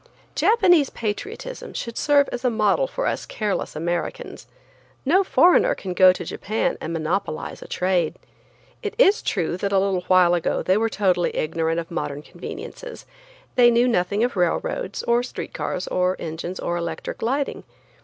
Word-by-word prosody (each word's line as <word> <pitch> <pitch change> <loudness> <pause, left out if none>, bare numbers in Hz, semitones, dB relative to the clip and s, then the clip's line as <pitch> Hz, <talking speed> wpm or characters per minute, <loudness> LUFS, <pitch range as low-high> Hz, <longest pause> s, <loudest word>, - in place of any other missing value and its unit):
Japanese 360 - +4
patriotism 410 - -5
should 235 -1 -5
serve 285 -1 +3
as 245 - -5
a 250 - +3
model 225 - +2
for - - -3
us - - -1
careless 210 -7 -3
Americans. 170 +2 -4 0.6
No 365 +8 +4
foreigner 370 +7 +4
can 185 -2 -5
go 185 0 +7
to 185 - -5
Japan 215 +3 -2
and 160 - -4
monopolize 165 +2 -3
a - - -9
trade. 180 -3 0 0.6
It 420 0 -4
is 430 -4 +5
true 175 -2 -1
that 200 +1 -2
a 195 - +3
little 190 -1 +1
while 180 -2 +5
ago 175 - 0
they 185 - +3
were 225 +2 +1
totally 185 -5 +1
ignorant 165 +1 0
of 165 0 -7
modern 150 -3 -4
conveniences. - - -9 0.5
They 245 -1 +6
knew 240 +1 +3
nothing 200 -1 +1
of 245 - 0
railroads, 485 - -1
or 235 0 +2
street 250 - -7
cars, - - -3
or 185 0 +1
engines, 170 +3 -5
or 175 - -2
electric 170 -1 -5
lighting. 270 +5 -1
200 Hz, 165 wpm, -23 LUFS, 175-265 Hz, 0.6 s, go